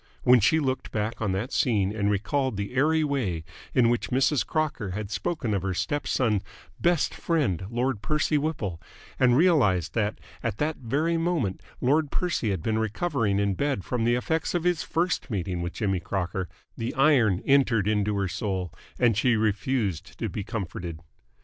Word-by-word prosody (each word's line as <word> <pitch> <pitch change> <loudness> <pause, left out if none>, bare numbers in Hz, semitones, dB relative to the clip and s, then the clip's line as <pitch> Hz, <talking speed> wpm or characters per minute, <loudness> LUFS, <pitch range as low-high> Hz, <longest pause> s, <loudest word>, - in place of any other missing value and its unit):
When 125 0 +7
she 115 +10 +4
looked 130 -3 -2
back 110 +2 -2
on 105 -3 0
that 105 +8 -3
scene 105 -5 +1
and 100 -1 +1
recalled 120 +4 0
the 100 +3 -4
airy 155 +4 +3
way 120 - -1 0.3
in 125 -2 +5
which 120 0 0
Mrs. 135 +2 +2
Crocker 145 - -2
had 105 -1 -5
spoken 140 -8 -2
of 100 - 0
her 95 0 -2
step 145 +7 -2
son's 110 -6 +1 0.4
"best 175 -2 +2
friend, 130 - 0
Lord 120 -1 -1
Percy 150 +3 0
Whipple" 140 - -2 0.4
and 125 -1 +5
realised 115 - +3
that 105 -2 0 0.2
at 110 -3 -2
that 155 +4 -1
very 150 +7 0
moment 165 - -1 0.2
Lord 145 +4 +2
Percy 170 -11 -1
had 95 -5 -2
been 110 0 0
recovering 110 - 0
in 100 -1 +1
bed 140 -3 -1
from 125 -3 -1
the 120 +1 +3
effects 160 +8 -1
of 175 - 0
his 175 -2 +1
first 170 -3 -1
meeting 95 -5 -2
with 85 0 -4
Jimmy 95 -2 0
Crocker, 90 0 -3 0.3
the 115 +1 -4
iron 130 -10 +4
entered 125 -7 +3
into 105 -1 +1
her 100 -1 0
soul 95 -1 -3 0.2
and 120 -3 +3
she 115 +3 +3
refused 105 - -1
to 115 - -2
be 100 +3 -4
comforted. 90 -6 -5
115 Hz, 175 wpm, -26 LUFS, 100-140 Hz, 0.4 s, When